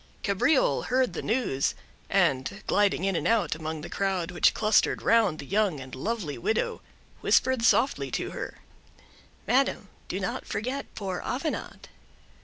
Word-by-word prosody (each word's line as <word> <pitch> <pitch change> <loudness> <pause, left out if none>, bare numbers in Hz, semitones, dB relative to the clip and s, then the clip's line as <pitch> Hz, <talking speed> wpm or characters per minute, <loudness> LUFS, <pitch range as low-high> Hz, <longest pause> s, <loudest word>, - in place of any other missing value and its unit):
Cabriole 225 - +2
heard 255 0 +1
the - - -4
news, 215 - 0 0.3
and, 135 +11 +1
gliding 205 -3 +2
in 195 -1 +1
and 165 - 0
out 225 -3 +2
among 155 0 -5
the 170 - -6
crowd 190 -3 -1
which 175 - +3
clustered 215 0 +2
round 220 -8 +3
the 140 - -8
young 195 -3 +1
and 130 -1 -10
lovely 170 - -3
widow, 220 - -1 0.4
whispered 260 -2 +3
softly 240 +3 +3
to - - -3
her—"Madam, 270 +2 -4 0.2
do - - -3
not - - -4
forget 255 +6 -3
poor 190 -4 -4
Avenant." 280 +6 -4
200 Hz, 140 wpm, -27 LUFS, 160-235 Hz, 0.4 s, which